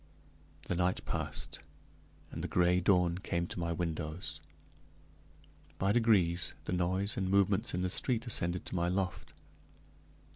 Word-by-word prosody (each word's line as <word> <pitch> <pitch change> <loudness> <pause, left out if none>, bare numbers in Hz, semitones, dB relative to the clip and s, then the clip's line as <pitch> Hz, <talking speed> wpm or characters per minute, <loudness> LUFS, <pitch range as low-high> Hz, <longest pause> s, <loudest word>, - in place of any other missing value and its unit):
The - - -2
night 90 +1 0
passed, - - -3 0.7
and - - -5
the - - -1
gray 90 0 +3
dawn 90 -1 +3
came 85 -3 -1
to 85 - -6
my 85 0 -1
windows; 80 0 -3 1.4
by 100 +1 +2
degrees 100 -7 +3
the - - -2
noise 95 +3 0
and 95 -1 0
movements 100 0 +2
in 90 - -1
the 90 - 0
street 120 +1 +1
ascended 90 -6 -1
to - - -5
my 85 -1 +1
loft. 90 -1 -2
90 Hz, 140 wpm, -32 LUFS, 85-95 Hz, 1.4 s, gray